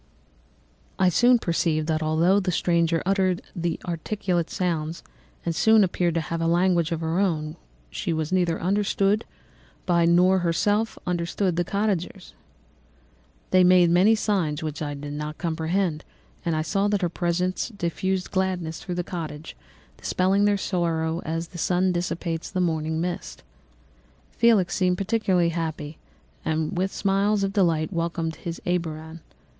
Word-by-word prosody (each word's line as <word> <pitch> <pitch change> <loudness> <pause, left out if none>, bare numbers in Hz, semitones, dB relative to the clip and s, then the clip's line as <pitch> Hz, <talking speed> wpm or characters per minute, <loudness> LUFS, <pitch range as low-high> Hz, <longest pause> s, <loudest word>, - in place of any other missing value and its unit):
"I 185 -1 +4
soon 245 +7 +5
perceived 165 -5 0
that 155 0 0
although 165 +5 +3
the 185 -2 -1
stranger 170 -1 +1
uttered 190 -2 +1 0.4
articulate 175 0 -2
sounds 165 -3 -2 0.4
and 215 +6 +4
appeared 175 -2 -1
to 165 - +1
have 165 +1 -4
a 165 - +1
language 175 -1 +2
of 165 -1 -2
her 165 +2 0
own, 155 -6 0 0.4
she - - -3
was 160 0 -2
neither 175 -3 +1
understood 200 +2 +1 0.6
by 170 -2 +3
nor 180 +3 +4
herself 205 +6 0
understood 175 +1 -1
the 175 - +1
cottagers. 195 -1 -2 1.2
They 185 0 +6
made 180 -1 +5
many 190 +6 +5
signs 180 -8 -1
which 155 -1 -4
I 145 -1 -3
did 145 +1 -7
not 150 +1 -5
comprehend, 165 0 -1 0.4
but 165 -2 0
I 155 - 0
saw 195 +5 0
that 205 -2 0
her - - +3
presence 175 +3 -1
diffused 190 -2 -2
gladness 185 -4 -1
through 180 - -5
the 175 - -1
cottage, 160 -3 -6 0.4
dispelling 195 +2 +1
their 205 -1 +3
sorrow 170 -3 -1
as 165 +1 -3
the 175 - -9
sun 180 +2 +2
dissipates 175 -1 -3
the 185 - -3
morning 160 -2 0
mists. 175 0 -5 0.9
Felix 220 -7 +3
seemed 180 -1 +1
peculiarly 195 -4 +1
happy 160 -2 -4 0.4
and 160 +1 -1
with 190 +2 0
smiles 200 +1 +1
of 195 0 -1
delight 170 -3 +1
welcomed 165 -1 -2
his 170 -1 -5
Arabian. 165 -2 -3
175 Hz, 145 wpm, -25 LUFS, 165-190 Hz, 1.2 s, They